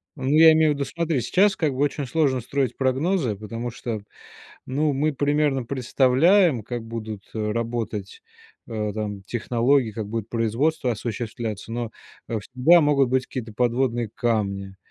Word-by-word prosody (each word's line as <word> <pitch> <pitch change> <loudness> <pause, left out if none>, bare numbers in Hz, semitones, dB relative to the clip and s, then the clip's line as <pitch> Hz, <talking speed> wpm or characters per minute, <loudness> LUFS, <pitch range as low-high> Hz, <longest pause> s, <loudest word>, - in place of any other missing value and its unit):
Ну, 130 - -6
я 160 +3 +7
имею 155 -1 +4
в - - +2
виду, 140 -1 -2
смотри, 165 -6 -1
сейчас 195 - +3
как 155 -6 0
бы - - -7
очень 145 0 0
сложно 130 -1 +1
строить 135 +2 -1
прогнозы, 135 - 0
потому 115 +4 -5
что, 115 -3 -5 0.7
ну, 145 +3 0
мы 150 +3 +1
примерно 145 -2 +1
представляем, 135 - +3
как 120 +2 -5
будут, 110 -2 -6
э, 105 -1 -1
работать, 115 -3 -4 0.4
э, 105 -2 -3
там, 105 -2 -4
технологии, 120 +3 +1
как 110 -1 -5
будет 110 -1 -4
производство 120 +5 0
осуществляться. 110 -1 -4
Но, 120 -1 -3 0.4
э, 115 - -1
всегда 130 +11 +4
могут 145 -4 +3
быть 130 0 +1
какие-то 115 -4 -6
подводные 120 -1 0
камни. 100 -5 -1
120 Hz, 155 wpm, -24 LUFS, 110-145 Hz, 0.7 s, я